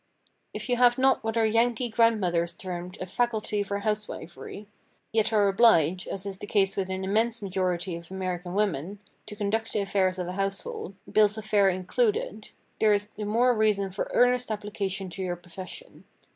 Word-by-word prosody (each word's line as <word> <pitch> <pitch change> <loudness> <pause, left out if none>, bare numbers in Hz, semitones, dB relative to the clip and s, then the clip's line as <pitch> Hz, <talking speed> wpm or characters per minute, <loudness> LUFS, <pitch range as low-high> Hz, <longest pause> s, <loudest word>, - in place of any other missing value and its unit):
If - - -5
you 245 -1 +1
have 245 0 +5
not 265 -2 +3
what 225 +1 -2
our 225 - +4
Yankee 230 +2 +2
grandmothers 190 -7 +2
termed 180 -3 -6
a - - -3
"faculty" 215 +1 -1
for 200 0 -3
housewifery—yet 210 +1 -4
are 210 -2 +4
obliged, 185 -5 +4
as 195 0 -3
is 195 -1 -5
the 205 - -7
case 195 -2 +2
with 190 -1 -2
an 190 0 -3
immense 220 +3 +1
majority 185 -2 -1
of 170 0 -10
American 185 -1 -4
women, 200 -2 -1 0.3
to 210 - -7
conduct 220 +2 -1
the - - +1
affairs 190 -2 +1
of 180 -1 -3
a 180 - -4
household, 195 0 -3 0.2
bills 210 0 +4
of 215 - -6
fare 205 -2 +4
included—there 405 - -1
is 205 0 -1
the 210 - -4
more 240 +4 +3
reason 210 -3 +1
for 190 - -3
earnest 245 -1 +3
application 205 -3 -3
to 190 - -5
your 180 -1 -2
profession. 180 - -10
205 Hz, 170 wpm, -27 LUFS, 185-220 Hz, 0.3 s, have